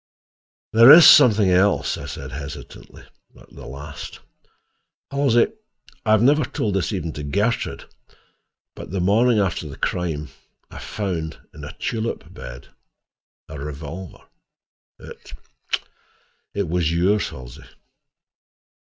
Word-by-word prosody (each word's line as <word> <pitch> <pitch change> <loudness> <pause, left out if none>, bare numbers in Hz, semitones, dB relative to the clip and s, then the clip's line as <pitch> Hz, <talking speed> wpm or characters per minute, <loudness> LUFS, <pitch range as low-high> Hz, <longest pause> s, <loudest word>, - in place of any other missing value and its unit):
"There 115 +4 +9
is 165 +1 +10
something 105 -5 +7
else," 95 +3 +2
I - - -8
said - - -8
hesitatingly, 70 +1 -10 0.4
at - - -19
the - - -11
last. 70 +2 -9 0.9
"Halsey, 140 - +2 0.5
I - - -3
have 110 +1 +4
never 150 +4 +4
told 105 -3 -3
this 95 +2 -1
even 85 -6 -4
to 75 - -7
Gertrude, 105 +12 -2 0.9
but - - -10
the 95 +3 -3
morning 110 +6 +3
after 90 -6 -1
the 70 - -10
crime, 80 -4 -3 0.4
I - - -9
found, 85 -6 -4 0.2
in 75 - -11
a 70 +1 -8
tulip 115 -1 -4
bed, - - -10 0.8
a 80 -3 -9
revolver. 75 +5 -8 0.8
It—it 100 -3 -9
was 85 -1 0
yours, 95 +5 +1
Halsey." 65 -3 -11
90 Hz, 115 wpm, -22 LUFS, 75-110 Hz, 0.9 s, is